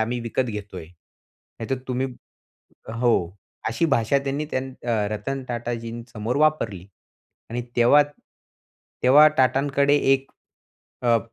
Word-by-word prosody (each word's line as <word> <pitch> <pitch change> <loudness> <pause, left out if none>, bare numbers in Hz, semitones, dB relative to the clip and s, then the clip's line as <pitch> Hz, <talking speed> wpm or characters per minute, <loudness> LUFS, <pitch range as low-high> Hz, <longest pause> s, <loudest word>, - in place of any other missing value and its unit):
आम्ही 120 +2 -1
विकत 120 +2 -1
घेतोय. 105 -6 -6
नाहीतर 110 +8 -9
तुम्ही 130 +1 0 0.9
हो, 115 -7 +1 0.3
अशी 145 +9 +1
भाषा 140 -2 +2
त्यांनी 140 +2 -2
त्यान 130 0 -3
अ, 120 - -1 0.2
रतन 130 +6 -3
टाटाजींसमोर 120 -1 -4
वापरली 130 - +1 0.6
आणि 120 +1 -3
तेव्हा 125 +5 +6 1.0
तेव्हा 145 +4 +8
टाटांकडे 140 +2 +3 0.2
1 135 0 0 0.7
अ, 120 -1 +4
120 Hz, 105 wpm, -24 LUFS, 115-135 Hz, 1.0 s, तेव्हा